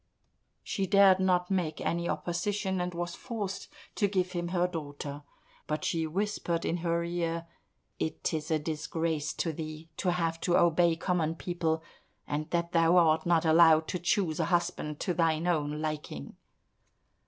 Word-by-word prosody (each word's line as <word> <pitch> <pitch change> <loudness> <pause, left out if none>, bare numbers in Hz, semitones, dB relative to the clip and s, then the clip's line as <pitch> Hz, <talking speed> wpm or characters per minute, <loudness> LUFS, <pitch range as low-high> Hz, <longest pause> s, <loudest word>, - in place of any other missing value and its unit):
She 195 -1 -2
dared 195 -1 +6
not 180 -1 +2
make 175 -5 0
any 170 0 -1
opposition, 180 +4 -1
and 180 0 -2
was 175 0 -3
forced 210 -6 -5 0.3
to 205 - +2
give 185 -2 0
him 175 -1 -2
her 175 0 +1
daughter. 145 -4 -6 0.5
But 150 0 -2
she 165 -1 0
whispered 175 -1 -1
in 170 - 0
her 170 0 0
ear, 170 -1 -2 0.5
"It 160 +1 -2
is 155 -1 -3
a 160 - +3
disgrace 160 0 -2
to 165 - -2
thee 155 +1 -7
to 185 - 0
have 165 -2 -1
to 175 - +3
obey 170 0 +4
common 165 -2 0
people, 165 -2 -1 0.4
and 150 +1 -3
that 170 0 -1
thou 165 0 +4
art 160 -1 +4
not 170 -1 +3
allowed 160 -1 +6
to 180 - -2
choose 175 -2 0
a - - +2
husband 170 -4 -1
to 180 - 0
thine 165 -1 +1
own 155 -3 0
liking." 150 - -5
170 Hz, 160 wpm, -30 LUFS, 160-180 Hz, 0.5 s, dared